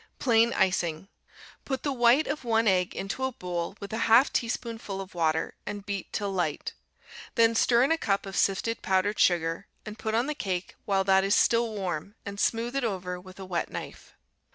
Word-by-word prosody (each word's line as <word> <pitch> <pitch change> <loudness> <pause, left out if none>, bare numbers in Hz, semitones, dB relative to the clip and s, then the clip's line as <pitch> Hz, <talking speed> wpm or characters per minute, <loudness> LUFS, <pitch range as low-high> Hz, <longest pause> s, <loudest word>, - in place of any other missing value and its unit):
Plain 235 -2 +3
Icing 180 -1 0 0.5
Put 265 -2 -3
the 285 - 0
white 245 +4 +4
of 290 0 -3
one 225 -1 +2
egg 185 -2 +2
into 195 +7 -4
a 260 - 0
bowl 180 -4 -4
with 200 +1 -7
a 220 - -2
half 235 +5 +6
teaspoonful 230 -4 -3
of 195 -1 -8
water, 160 -2 0
and 205 -1 -6
beat 200 -2 -4
till 205 -2 -2
light. 175 -6 -2 0.6
Then 230 0 +5
stir 235 +2 +4
in 275 - +2
a 325 - +2
cup 200 -2 0
of 195 -1 -7
sifted 215 +4 +1
powdered 195 +1 +1
sugar, 165 +1 +2 0.2
and 215 0 -8
put 220 0 -2
on 235 +2 +2
the 300 - -2
cake 190 -9 -3
while 195 -1 +2
that 190 0 +4
is 195 +1 +3
still 235 0 +3
warm, 190 0 -4
and 200 -1 -6
smooth 235 +4 0
it 275 - 0
over 185 -5 -3
with 185 +1 -14
a 190 - -6
wet 175 -2 -2
knife. - - -8
200 Hz, 200 wpm, -28 LUFS, 185-230 Hz, 0.6 s, half